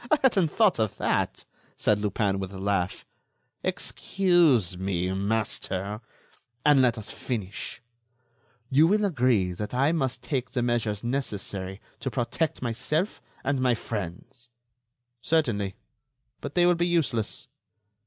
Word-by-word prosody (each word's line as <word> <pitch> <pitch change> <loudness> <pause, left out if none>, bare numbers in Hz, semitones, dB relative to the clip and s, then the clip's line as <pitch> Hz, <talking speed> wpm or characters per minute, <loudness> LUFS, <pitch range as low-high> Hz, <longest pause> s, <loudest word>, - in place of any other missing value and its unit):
"I 310 - +5
hadn't 195 -10 +4
thought 200 - +3
of 110 -3 0
that," - - 0 0.3
said 105 -1 +2
Lupin, 100 -1 0
with 95 -1 -4
a 95 - -8
laugh. 95 -2 -1 0.6
"Excuse 170 - +2
me, 95 0 -1
master... 100 0 -1 0.6
and 145 -2 +6
let 120 -2 +3
us 110 - -6
finish. 110 -1 -4 0.9
You 150 +5 +6
will 210 +3 +3
agree 125 - +2
that 105 +6 -5
I 135 +4 +3
must 130 -6 -1
take 130 -1 -2
the 125 - -1
measures 115 -4 0
necessary 100 -6 -3 0.2
to 130 - -2
protect 130 +5 -1
myself 130 - -1 0.2
and 135 -1 0
my 125 -2 +3
friends." 115 +5 -6 0.7
"Certainly; 115 -13 +1 0.6
but 145 - -7
they 175 -1 +5
will 175 - +6
be 175 0 +1
useless." 150 -11 0
120 Hz, 130 wpm, -27 LUFS, 100-145 Hz, 0.9 s, and